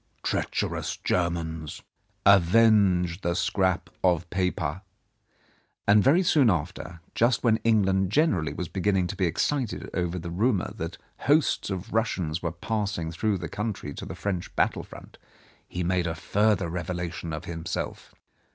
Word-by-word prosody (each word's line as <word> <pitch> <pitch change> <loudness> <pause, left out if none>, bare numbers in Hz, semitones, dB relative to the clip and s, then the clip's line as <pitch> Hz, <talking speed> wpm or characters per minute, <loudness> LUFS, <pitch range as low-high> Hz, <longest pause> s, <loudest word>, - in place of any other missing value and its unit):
Treacherous - - -2
Germans. 80 -3 -2 0.4
Avenge 100 -2 +5
the 85 -2 0
scrap 95 0 +1 0.2
of 90 -2 +2
paper," 90 -3 -1 1.1
and 100 0 +6
very 165 +8 +5
soon 145 -8 +4
after, 85 -1 -3
just 120 0 +2
when 115 -3 +4
England 95 -4 +2
generally 105 - +2
was 90 - -4
beginning 95 +1 +1
to 95 - -4
be 95 -2 +1
excited 120 - -1
over 90 -1 -1
the 85 -1 -5
rumour 100 +1 0
that 80 +1 -5 0.3
hosts 145 -5 +3
of 95 +3 -5
Russians 90 -8 0
were 85 - -2
passing 100 -2 -2
through 100 +4 0
the 85 -2 -5
country 100 -6 -4
to - - -7
the - - -6
French 95 -4 -4
battle - - +1
front, - - -13 0.5
he 90 - -3
made 90 0 +1
a 80 - -2
further 105 -2 +1
revelation 90 0 -4
of 80 +1 -5
himself. 85 -1 -5
90 Hz, 140 wpm, -27 LUFS, 85-105 Hz, 1.1 s, and